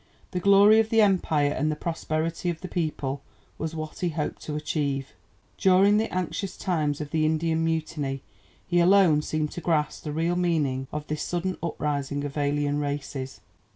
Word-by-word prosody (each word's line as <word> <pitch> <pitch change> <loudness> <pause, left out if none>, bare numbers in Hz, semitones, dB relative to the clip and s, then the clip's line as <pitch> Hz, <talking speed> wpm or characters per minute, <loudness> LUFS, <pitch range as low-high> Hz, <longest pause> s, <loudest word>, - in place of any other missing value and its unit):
"The 180 - -1
glory 200 +3 +6
of 220 0 +2
the 225 - +3
Empire 160 -7 +2
and 150 +2 0
the - - -2
prosperity 165 +1 -2
of 165 -2 -4
the 185 - -5
people" 150 -6 -2 0.4
was 160 0 -3
what 155 -1 -6
he 180 - 0
hoped 155 -2 -3
to 150 - -5
achieve. 140 -3 -2 0.5
During 195 +2 +5
the 220 +1 0
anxious 185 +1 -3
times 155 -6 -1
of 150 -1 -6
the 160 -1 +1
Indian 160 +1 +1
Mutiny 155 -4 -2 0.4
he 175 0 +2
alone 175 -4 +5
seemed 155 0 -2
to 175 - -6
grasp 155 -4 0
the 150 - -4
real 165 +3 0
meaning 150 -7 0
of 150 0 -4
this 150 0 -3
sudden 180 +3 -2
uprising 145 -3 -2
of 145 -1 -5
alien 145 0 0
races. 140 -2 -4
155 Hz, 175 wpm, -26 LUFS, 145-175 Hz, 0.5 s, glory